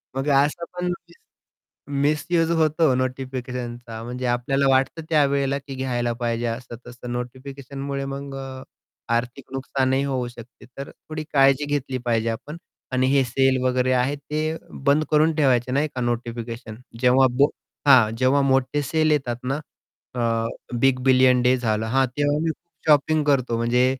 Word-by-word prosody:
मग 135 +2 -2 0.2
असं 150 +4 -3
पण 180 - -2 0.2
मिस 170 - -19 0.9
मिस्यूज 160 +3 +1
होतो 155 -3 +3
नोटिफिकेशनचा 125 -3 -4
म्हणजे 125 +1 -4
आपल्याला 135 +3 +1
वाटतं 135 +4 +2
त्यावेळेला 140 -2 +2
की 140 -1 -9
घ्यायला 120 -2 -1
पाहिजे, 120 0 -2
असं-तसं 120 +1 -7
नोटिफिकेशनमुळे 135 +2 -5
मग 140 0 -6
अ, 130 -1 -7 0.5
आर्थिक 125 +3 -3
नुकसानही 135 0 0
होऊ 130 -3 -2
शकते. 120 0 -13
तर 140 - -6
थोडी 155 0 -8
काळजी 135 0 +4
घेतली 140 -3 -2
पाहिजे 115 -1 +1
आपण 145 +8 -6 0.4
आणि 130 0 +2
हे 140 -1 +4
सेल 130 +1 +2
वगैरे 130 0 +2
आहे, 130 +3 +1
ते 155 +3 -3 0.3
बंद 145 +2 +4
करून 155 +1 +4
ठेवायचं 130 -4 +2
नाही 145 +3 +1
का, 125 - -3
नोटिफिकेशन 120 -1 -4 0.3
जेव्हा 130 +1 +5
बो 140 +2 +5 0.4
हां, 125 -6 +7
जेव्हा 130 +3 +3
मोठे 135 +2 +1
सेल 155 +2 +1
येतात 135 -5 0
ना 135 +2 -1 0.6
अ, 125 - -3 0.6
बिग 135 0 +3
बिलियन 130 -1 +5
डे 125 +1 +4
झाला 110 -2 -1
हां, 135 0 +4
तेव्हा 145 +3 0
मी 165 - +1
खूप 170 +2 -12
शॉपिंग 150 +1 +4
करतो, 130 -5 +1
म्हणजे 120 +2 +2
130 Hz, 150 wpm, -23 LUFS, 125-140 Hz, 0.9 s, हां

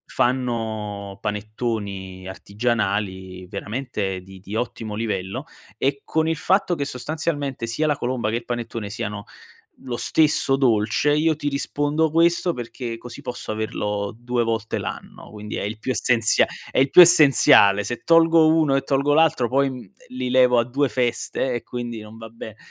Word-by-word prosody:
fanno 110 -5 -2
panettoni 105 -3 -4
artigianali 100 -3 -2
veramente 105 -5 -4
di 95 0 -14
di 100 +3 -7
ottimo 115 -3 -4
livello, 100 -4 -3 0.3
e 140 +1 -1
con 160 0 0
il 165 - 0
fatto 185 +1 +1
che 145 -3 -2
sostanzialmente 145 -2 -3
sia 155 +7 0
la 145 -1 +1
colomba 120 -5 -2
che 115 - -1
il 120 - -5
panettone 115 -3 -5
siano 105 -2 -5 0.6
lo 125 -2 -4
stesso 150 -3 +2
dolce, 120 +3 +2
io 155 +1 +2
ti 145 -1 -3
rispondo 145 +2 0
questo 170 +2 +2
perché 120 -2 -6
così 120 +1 -10
posso 120 -3 -5
averlo 105 -2 -3
2 120 0 -1
volte 115 -1 -2
l'anno, - - -8
quindi 105 0 -8
è - - -3
il 105 +2 -4
più 130 +4 -2
essenzia 115 -1 +2 0.3
è - - +2
il 135 - +3
più - - +8
essenziale: 140 - +6
se 120 - -4
tolgo 165 -1 +5
uno 155 -4 +3
e 135 - +3
tolgo 140 +1 +1
l'altro 155 -6 +3
poi, 135 +1 +2
mhmm, 130 - -7
ehm, 100 - -16 0.2
li 125 0 -4
levo 125 -1 +5
a 115 - +3
2 135 +4 0
feste 125 +1 -1
e 120 - -3
quindi 120 -2 -6
non 105 +1 -12
va 115 0 -9
be 110 -1 -10
120 Hz, 165 wpm, -22 LUFS, 105-140 Hz, 0.6 s, più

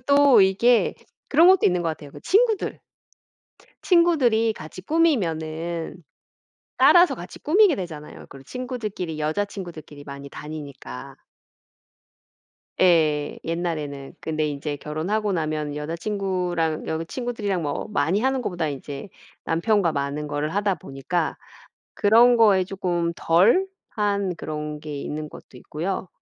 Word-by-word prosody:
또 280 -2 +5
이게 210 +5 +3 0.3
그런 320 +4 +6
것도 375 0 +6
있는 180 -1 +3
것 165 - 0
같아요 145 -2 -9
그 - - -12
친구들. 440 +1 +1 1.0
친구들이 275 - +3
같이 170 -2 -10
꾸미면은 170 - -1 0.8
따라서 350 0 +6
같이 - - -10
꾸미게 370 +1 +4
되잖아요. 160 - -8
그리고 135 - -12
친구들끼리 215 - -5
여자친구들끼리 160 -3 -4
많이 140 0 -8
다니니까. 140 - -8 1.6
예. 155 -5 +3
옛날에는 155 -5 -4
근데 155 -1 -1
인제 145 0 -4
결혼하고 185 +9 -2
나면 155 -3 -2
여자친구랑 175 0 -2
여자 160 +1 -2
친구들이랑 210 -3 -3
뭐 145 +7 -3
많이 180 +3 +1
하는 265 +1 +1
것보다 175 -7 -2
이제 140 +3 -7 0.4
남편과 175 +1 +1
많은 140 +1 -3
거를 150 +2 -2
하다 205 -1 +1
보니까 145 +5 -3 0.6
그런 235 +4 +5
거에 205 -5 +5
쪼끔 175 -3 -2
덜 205 - +4 0.3
한 200 -4 0
그런 150 -1 -5
게 150 -2 -6
있는 150 +1 -5
것도 130 - -13
있고요. 180 +8 -4
175 Hz, 290 characters per minute, -24 LUFS, 150-215 Hz, 1.6 s, 그런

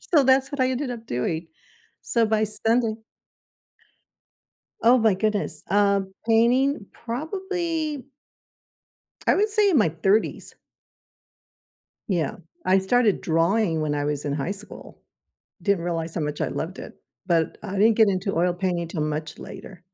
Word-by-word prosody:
So, 310 -5 +3
that's 265 +1 +4
what 285 - -3
I 255 0 +3
ended 260 0 -2
up 230 -2 -7
doing. 160 +7 -2 0.6
So, 230 -1 +1
by 215 0 +2
Sunday 225 +2 +1 1.9
Oh 240 +3 +6
my 220 -3 +4
goodness, 200 -5 -2
um, 200 -1 +2
painting 235 +2 +3
probably 320 +2 -3 1.2
I - - +5
would 415 +2 +3
say 420 -1 +3
in 340 - +3
my 210 -8 +4
30s. 190 +7 0 1.5
Yeah, 170 -8 -1 0.3
I 190 +1 +4
started 215 +2 +2
drawing 165 +1 +1
when 150 -1 -1
I 145 - -1
was 145 0 -2
in 145 - -1
high 145 +6 -2
school. 205 +1 -10 0.6
Didn't 200 -4 +1
realize 165 -1 -3
how 170 - -2
much 150 0 -3
I - - 0
loved 180 +4 -5
it, - - -9 0.3
but 165 -3 +1
I 200 -2 -6
didn't 220 +3 +5
get 220 -2 +6
into 195 0 -1
oil 175 +2 +2
painting 175 -2 -2
'til 160 -2 -3
much 155 +1 -4
later. 185 -2 -10
200 Hz, 145 wpm, -24 LUFS, 170-245 Hz, 1.9 s, Oh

